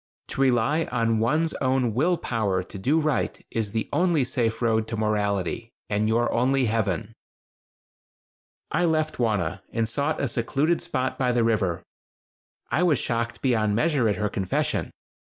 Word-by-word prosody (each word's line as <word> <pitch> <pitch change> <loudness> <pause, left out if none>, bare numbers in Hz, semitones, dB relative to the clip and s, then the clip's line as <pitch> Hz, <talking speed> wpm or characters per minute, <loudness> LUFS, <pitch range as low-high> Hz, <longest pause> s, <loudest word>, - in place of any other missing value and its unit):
To - - -3
rely 135 +5 +2
on 115 -2 0
one's 155 +8 +1
own 130 -3 +1
will 165 +9 +2
power 100 - -1
to 95 - -10
do 145 +11 +2
right 155 -3 0
is 110 -3 -2
the 110 0 -2
only 175 -5 +3
safe 120 -3 -1
road 110 -2 +1
to 115 - -4
morality, 105 0 -1 0.2
and 105 +1 +1
your 115 +2 +1
only 130 +2 +2
heaven." 110 -1 -1 1.6
I 175 +2 +2
left 155 -3 0
Wauna 100 -6 0
and 115 -1 0
sought 140 +7 -1
a 140 - 0
secluded 140 +8 0
spot 150 -7 -2
by 125 -2 +2
the 120 -1 +2
river. 95 -7 0 0.9
I 160 - +2
was 170 -6 +3
shocked 115 0 -2
beyond 110 -5 +2
measure 135 -3 +2
at 105 - +1
her 105 0 -1
confession. 95 -2 -1
115 Hz, 155 wpm, -25 LUFS, 110-140 Hz, 1.6 s, only